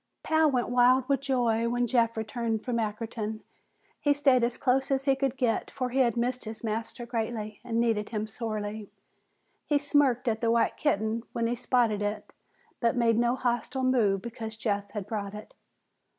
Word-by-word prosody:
Pal 315 -1 +3
went 250 -3 0
wild 250 +1 +4
with 275 -2 +1
joy 235 -4 +1
when 245 +1 +1
Jeff 230 -1 +1
returned 220 0 -2
from 245 -2 -1
Ackerton. 220 0 -3 0.6
He 290 -1 +2
stayed 270 -4 +4
as 235 0 0
close 265 +1 +1
as 270 0 0
he 270 -1 +4
could 270 -1 -1
get, 245 -4 0
for 255 -2 -3
he 265 - 0
had 240 -3 +3
missed 250 +1 -1
his 220 +1 -8
master 225 +2 -3
greatly 225 -2 -3
and 230 -1 -1
needed 225 -3 +1
him 215 -1 -2
sorely. 215 -1 -5 0.8
He 295 - +3
smirked 285 -4 +2
at 220 -1 0
the 230 - +2
white 230 0 +2
kitten 220 -5 0
when 235 -2 -1
he 235 +1 0
spotted 235 -4 +1
it, 205 0 -3 0.5
but 235 -1 +2
made 230 -2 +3
no 240 +1 +2
hostile 250 +1 -1
move 220 -7 +2
because 225 -2 -6
Jeff 205 -2 -1
had 205 -2 -5
brought 205 -1 -4
it. 210 - -10
235 Hz, 180 wpm, -28 LUFS, 220-255 Hz, 0.8 s, wild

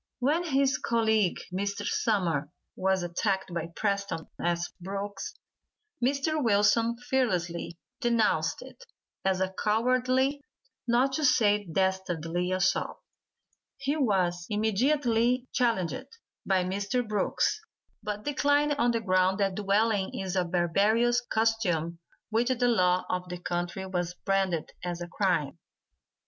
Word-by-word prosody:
When 300 +7 +1
his 275 -3 +2
colleague, 220 -5 +2 0.2
Mr. 200 +2 -2
Sumner, 175 -12 0 0.3
was 190 -1 +1
attacked 190 +1 -1
by 170 -1 -2
Preston 200 -5 -1 0.2
S. 170 0 0
Brooks, 195 +1 -5 0.7
Mr. 285 +4 +1
Wilson 225 +2 +3
fearlessly 180 -10 -1 0.2
denounced 235 -4 +1
it - - -13 0.4
as 190 -1 +1
a 190 0 -1
cowardly, 255 +5 +2 0.5
not 250 +3 +3
to 310 - -1
say 210 -6 +3
dastardly 180 -2 -1
assault. 185 -1 0 0.8
He 275 +2 -1
was 185 - +1
immediately 240 +3 +1
challenged 240 +1 0 0.4
by 190 -2 +3
Mr. 200 +6 -1
Brooks, 215 - 0 0.4
but 210 0 -4
declined 290 +1 +2
on 240 - +3
the 230 -1 0
ground 185 -1 +2
that 195 -2 +1
dueling 205 0 +1
is 190 -1 -3
a 185 - +2
barbarous 200 +8 +2
custom 180 -8 0 0.3
which 235 +3 +2
the 250 -1 +2
law 185 -6 +3
of 180 0 -3
the 180 - -4
country 175 +2 -3
has 175 -1 -1
branded 190 -4 0
as 175 -1 -3
a 175 - -5
crime. 175 -5 0
205 Hz, 120 wpm, -28 LUFS, 180-240 Hz, 0.8 s, Wilson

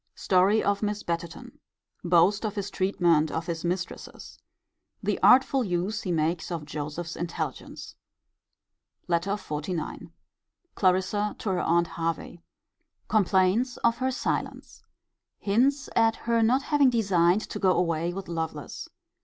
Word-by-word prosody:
Story 195 +4 +3
of 200 0 0
Miss 210 0 -2
Betterton. 170 -1 -5 0.4
Boast 180 +4 +3
of 215 -1 -3
his 200 -1 -4
treatment 175 -5 +2
of 160 +1 -3
his 170 -2 -4
mistresses. 180 +1 -5 0.6
The - - -1
artful 265 +1 +5
use 195 +2 -2
he 185 - -3
makes 165 +2 -1
of 165 -3 -4
Joseph's 150 +3 -5
intelligence. 170 0 -5 1.1
LETTER 175 +3 0
XLIX. 155 -1 -5 0.6
Clarissa 190 +2 +1
to 210 - -4
her 185 - 0
aunt 170 +1 +2
Hervey. 165 +1 -4 0.7
Complains 205 +4 +2
of 235 0 +3
her 260 0 0
silence. 255 - -4 0.6
Hints 265 +8 +1
at 225 -1 +3
her 230 -1 +2
not 250 +5 +3
having 290 -3 +3
designed 195 -5 +2
to - - -6
go 190 -2 +3
away 170 -1 0
with 195 +2 -7
Lovelace. 160 -3 -5
185 Hz, 130 wpm, -26 LUFS, 170-215 Hz, 1.1 s, artful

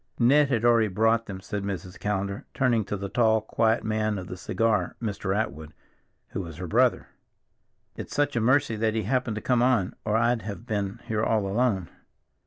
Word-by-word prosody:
"Ned 140 +4 +4
had 120 -3 +1
already 115 -2 +5
brought 110 +3 +1
them," 95 -2 -6
said 105 +1 -4
Mrs. 95 -2 -5
Callender, 100 -1 -3
turning 120 -4 +2
to 105 +2 -3
the 100 +1 -4
tall, 110 +1 +3
quiet 110 +1 +1
man 110 -1 0
of 95 - -5
the 90 - -7
cigar, 110 +4 0
Mr. 100 -3 -2
Atwood, 80 - -4 0.5
who - - -4
was 80 -4 -8
her 90 - -5
brother. 80 - +2 0.9
"It's - - -7
such 145 -2 +1
a 115 - +1
mercy 130 +1 +3
that 110 0 0
he 110 - 0
happened 125 +1 0
to 110 - -4
come 125 -2 +2
on, 120 -7 +2
or 105 +1 +1
I'd 115 0 +2
have 105 +3 -7
been 105 0 -3
here 110 -2 -1
all 110 -3 +1
alone." 100 -3 0
110 Hz, 195 wpm, -26 LUFS, 100-115 Hz, 0.9 s, already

